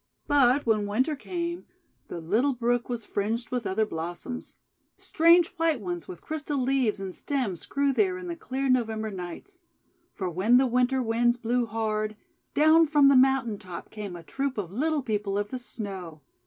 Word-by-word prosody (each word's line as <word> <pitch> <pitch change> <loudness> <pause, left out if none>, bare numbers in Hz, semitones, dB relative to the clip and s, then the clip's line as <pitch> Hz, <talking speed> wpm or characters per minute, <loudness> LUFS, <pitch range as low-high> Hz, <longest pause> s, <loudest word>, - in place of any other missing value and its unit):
But 280 -1 +4
when 215 -3 +2
Winter 255 +9 +1
came, 345 +3 -4 0.4
the 175 - -6
little 220 - +1
brook 240 0 0
was 235 -3 -4
fringed 225 +4 -2
with 245 -4 -2
other 215 +3 +1
blossoms. 175 +8 -6 0.4
Strange 335 +1 +4
white 325 -4 +1
ones 175 -4 -5
with 175 -2 -10
crystal 300 -2 -3
leaves 255 -5 +1
and 190 -1 -5
stems 245 - -3
grew 280 0 +1
there 370 +4 +1
in 360 - -8
the 345 -1 -4
clear 270 -4 -3
November 220 -4 0
nights. 190 - -8 0.5
For 190 - -4
when 190 +8 +3
the 265 - +4
Winter 250 +1 +1
Winds 240 +1 +2
blew 240 0 0
hard, 215 -1 -2 0.4
down 315 +2 +6
from 290 -2 +5
the 275 - +5
mountain 255 -5 +3
top 180 -2 -9
came 205 -4 -6
a 170 - -9
troop 275 - -3
of 185 -5 -4
Little 295 +6 0
People 210 -4 -1
of 205 0 -2
the 255 - -4
Snow. 190 -10 -6
240 Hz, 175 wpm, -27 LUFS, 205-275 Hz, 0.5 s, down